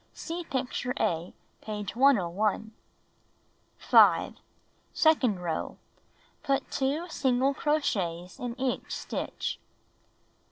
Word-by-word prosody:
(See 345 +1 -5
picture 250 -2 -2
A, 170 +1 0 0.3
page 210 -1 -5
101.) 215 -4 +2 1.1
5. - - +5 0.6
Second 260 - +3
row: 165 -2 -3 0.6
Put 275 -1 -1
2 290 +5 -1
single 265 -2 +1
crochets 190 - -1
in 245 0 -5
each 260 -1 -2
stitch. - - -4
250 Hz, 85 wpm, -28 LUFS, 200-275 Hz, 1.1 s, 5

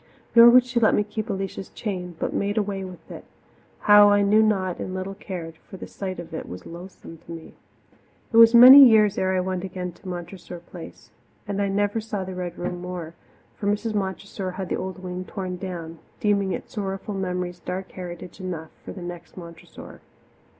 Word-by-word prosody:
Nor 235 0 +9
would 250 +1 +6
she 250 -1 -1
let 220 - +4
me 210 - +2
keep 215 +2 -6
Alicia's 195 -1 -4
chain, 180 -5 -5
but - - -3
made 205 +2 -1
away 200 -2 -1
with 185 -2 -11
it, - - -9 0.6
how 205 0 +7
I 205 0 +4
knew 210 +2 +4
not 190 -5 0
and 185 - -5
little 185 +1 -4
cared, 170 -5 -8
for 190 - -13
the - - -8
sight 190 -2 -6
of 170 -1 -9
it 160 - -6
was 90 +1 -9
loathsome 170 -1 -11
to - - -14
me. 165 -1 -9 0.8
It - - +3
was 230 +1 +8
many 260 +4 +11
years 215 -5 +5
ere 190 0 +1
I - - +1
went 185 0 -3
again 180 -1 -5
to 180 +3 -16
Montressor 175 0 -7
Place, 170 0 -12 0.4
and 200 0 -2
I 200 - +1
never 205 +2 0
saw 210 -3 -4
the 185 0 -7
Red 180 -1 -5
Room 175 0 -4
more, 180 -3 -6 0.4
for 200 - -4
Mrs. 210 +2 -1
Montressor 190 -1 -4
had 185 -1 -6
the - - 0
old 185 0 -6
wing 180 0 -5
torn 185 -2 -6
down, 170 -3 -7 0.2
deeming 200 -2 +1
its - - -6
sorrowful 195 0 -4
memories 180 -2 -3
dark 185 +2 -6
heritage 180 0 -9
enough 165 -4 -6
for - - -8
the 185 - -9
next 175 +1 -9
Montressor. 170 -2 -12
190 Hz, 200 wpm, -24 LUFS, 180-205 Hz, 0.8 s, many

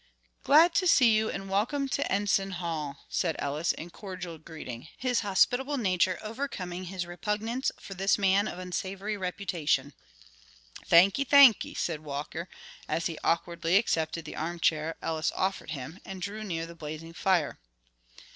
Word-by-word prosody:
"Glad 325 +4 +6
to 370 +1 +2
see 250 -8 +6
you 220 0 +2
and 195 - -5
welcome 220 +9 0
you 275 - -3
to 280 +2 -1
Enson 195 -1 +1
Hall," 160 -5 -4
said 165 -4 0
Ellis 150 +4 0
in 170 +2 -8
cordial 180 -5 -7
greeting, 155 -6 -8
his 250 -2 +1
hospitable 245 +8 +2
nature 185 -5 +2
overcoming 200 -6 -5
his 180 0 -4
repugnance 215 +8 -2
for 195 - -9
this 195 +1 +2
man 200 +1 +3
of - - -6
unsavory 190 +3 -4
reputation. 175 -7 -1 0.9
"Thanky, 190 +10 +6
thanky," 280 -5 +6
said 165 -3 -1
Walker, 150 +4 -5 0.4
as 165 - -1
he 165 -2 -3
awkwardly 170 +1 +1
accepted 165 -6 0
the - - -7
armchair 165 -1 0
Ellis 160 0 0
offered 190 -3 -1
him, 155 +4 -6
and 190 -1 -7
drew 205 +4 -5
near 165 -5 -3
the 170 - -10
blazing 160 0 -8
fire. 175 -4 +1
185 Hz, 150 wpm, -29 LUFS, 165-210 Hz, 0.9 s, Glad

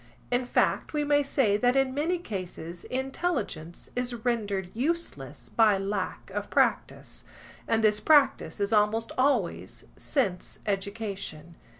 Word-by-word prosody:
In 245 +1 +2
fact, - - +1
we 300 -1 +1
may 290 0 +3
say 265 -7 +2
that 245 +3 +2
in 270 -1 +2
many 320 +6 0
cases 180 - -6
intelligence 260 - -3
is 245 0 -1
rendered 205 -6 -1
useless 335 +8 -3
by 215 -3 +4
lack 195 -1 -3
of - - -4
practice, - - 0 0.4
and 225 0 +2
this 210 -1 +4
practice 290 -4 +3
is 200 +2 0
almost 215 +2 +2
always 255 -8 0
sense 200 -11 -1
education. 195 -5 -4
225 Hz, 125 wpm, -28 LUFS, 200-270 Hz, 0.4 s, by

